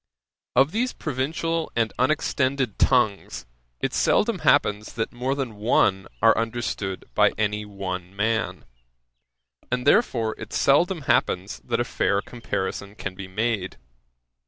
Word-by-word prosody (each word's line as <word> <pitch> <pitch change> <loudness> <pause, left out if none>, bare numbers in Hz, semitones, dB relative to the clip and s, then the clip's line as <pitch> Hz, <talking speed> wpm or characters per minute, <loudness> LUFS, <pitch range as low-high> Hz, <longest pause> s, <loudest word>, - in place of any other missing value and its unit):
Of 135 +4 +5
these 245 +5 0
provincial 160 +3 -2
and 115 -1 +1
unextended 130 -3 0
tongues, 120 -6 +1 0.4
it - - -1
seldom - - +2
happens 105 +1 +2
that 115 - -3
more 130 +3 -1
than 130 -6 -4
one 100 -3 +2 0.2
are - - +7
understood 115 -4 -3
by - - +4
any 105 0 -1
one 95 -2 -6
man; 110 +2 -1 1.1
and, 125 0 -1
therefore, 125 - +3
it - - -8
seldom 165 +5 +3
happens 95 -7 0
that 120 -1 -2
a - - +3
fair 100 -4 0
comparison 100 -3 -4
can 95 -3 -5
be 95 0 -8
made. 105 -1 -2
115 Hz, 130 wpm, -24 LUFS, 100-130 Hz, 1.1 s, are